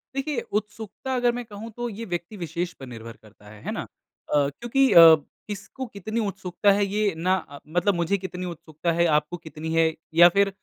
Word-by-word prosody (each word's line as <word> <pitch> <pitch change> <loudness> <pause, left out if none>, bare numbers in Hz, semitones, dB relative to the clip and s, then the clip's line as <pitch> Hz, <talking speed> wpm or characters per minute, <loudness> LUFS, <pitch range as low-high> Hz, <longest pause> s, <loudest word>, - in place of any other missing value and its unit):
देखिए 275 -2 -1 0.2
उत्सुकता 220 +4 -7
अगर 245 -1 +3
मैं 245 +1 -4
कहूँ 215 +1 -9
तो 240 0 -2
ये 225 +1 -7
व्यक्ति 175 +5 -4
विशेष 170 0 -3
पर 135 - -11
निर्भर 115 -1 -9
करता 105 -1 -17
है 105 -1 -7
ना? - - -3 0.5
अ, 145 -1 +3
क्योंकि 240 - +1
अ, 165 -1 +10 0.3
किसको 210 +6 -6
कितनी 215 +3 -3
उत्सुकता 195 0 +1
है 200 +1 +2
ये 205 0 0
ना 180 +3 +2
अ, 145 -6 -7
मतलब 175 +5 +1
मुझे 170 +3 +1
कितनी 185 -1 -6
उत्सुकता 170 -1 -4
है 170 - +5
आपको 150 +4 -3
कितनी 160 0 -6
है 165 -1 +3 0.2
या 170 +2 +8
फ़िर 200 +2 +3
180 Hz, 190 wpm, -25 LUFS, 160-210 Hz, 0.5 s, अ